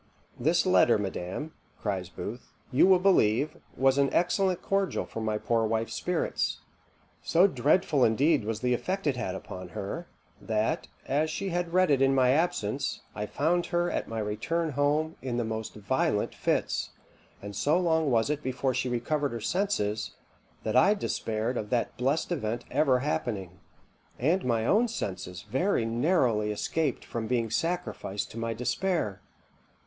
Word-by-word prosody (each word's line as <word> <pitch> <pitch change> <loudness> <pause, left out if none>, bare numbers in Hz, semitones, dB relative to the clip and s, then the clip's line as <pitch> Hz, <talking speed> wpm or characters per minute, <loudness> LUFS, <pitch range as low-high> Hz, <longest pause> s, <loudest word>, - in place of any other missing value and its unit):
"This 165 +8 +2
letter, 180 -11 +5
madam," 100 - -4 0.3
cries 95 -4 -2
Booth, 110 +7 -7 0.2
"you 135 +8 +5
will 190 -1 +7
believe, 150 - +3 0.2
was 135 +1 +3
an 140 -1 +3
excellent 185 +1 +1
cordial 195 -1 0
for 115 - -6
my 110 -1 0
poor 115 +1 +1
wife's 110 +1 -1
spirits. 180 -1 -1 0.6
So 175 +3 +4
dreadful 150 -1 +2
indeed 135 +4 +3
was 110 0 -3
the 125 0 +2
effect 185 +9 -2
it 145 -3 +2
had 105 -7 -3
upon 90 -1 -8
her, 165 - -4 0.3
that, 110 -1 -1 0.2
as 150 +3 +1
she 195 +5 -3
had 175 -1 -2
read 185 -3 +4
it 135 -2 +3
in 135 0 +4
my 130 -1 +4
absence, 140 -6 0
I 105 0 -4
found 170 +8 +1
her, 175 0 0
at - - -2
my 115 - -5
return 150 +11 -1
home, 150 +3 +1
in 125 -2 -3
the 120 - 0
most 110 0 -4
violent 105 0 0
fits; - - -1 0.5
and 100 0 -8
so 150 - +2
long 160 -4 +2
was 115 +2 +2
it 150 0 -2
before 130 0 -1
she 125 - -1
recovered 140 +3 -1
her 115 - -3
senses, 110 - -1 0.5
that 110 - -2
I 195 +11 +6
despaired 115 - -2
of 105 - -4
that 120 0 0
blest 135 +8 0
event 120 -7 -2
ever 130 -4 +3
happening; 100 - -3 0.6
and 165 +9 +1
my 115 -2 +1
own 220 - +4
senses 90 - -5
very 135 - +1
narrowly 115 - +2
escaped 155 +9 -1
from 115 -2 -4
being 115 -3 0
sacrificed 165 - -2
to 115 - -7
my 115 0 -2
despair. 125 - -1
130 Hz, 160 wpm, -28 LUFS, 110-165 Hz, 0.6 s, will